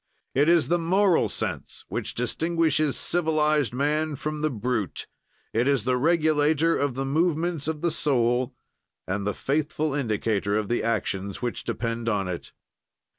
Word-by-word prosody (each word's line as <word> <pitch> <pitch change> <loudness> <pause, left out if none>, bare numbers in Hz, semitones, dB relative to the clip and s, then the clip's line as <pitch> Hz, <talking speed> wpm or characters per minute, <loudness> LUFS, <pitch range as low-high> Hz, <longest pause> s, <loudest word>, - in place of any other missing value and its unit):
"It 145 +4 +3
is 170 -2 +4
the 175 +1 +2
moral 185 +2 +3
sense - - -4
which - - -4
distinguishes 155 +3 +1
civilized 155 -4 +1
man 150 +4 0
from 150 +2 -4
the 155 - +2
brute; 115 - -2 0.5
it 120 +4 +2
is 140 -6 +2
the 125 +2 +1
regulator 155 +2 +3
of 140 -3 0
the 135 +1 -2
movements 160 +1 0
of 155 -1 -2
the 170 - +1
soul 125 -4 +1 0.5
and 100 +2 -2
the 105 - -1
faithful 150 +1 -1
indicator 110 -6 0
of 105 -2 -2
the 120 - +1
actions 100 -3 -2
which 120 - -3
depend 115 0 -2
on 100 -3 0
it." 90 -2 -5
145 Hz, 150 wpm, -26 LUFS, 115-155 Hz, 0.5 s, is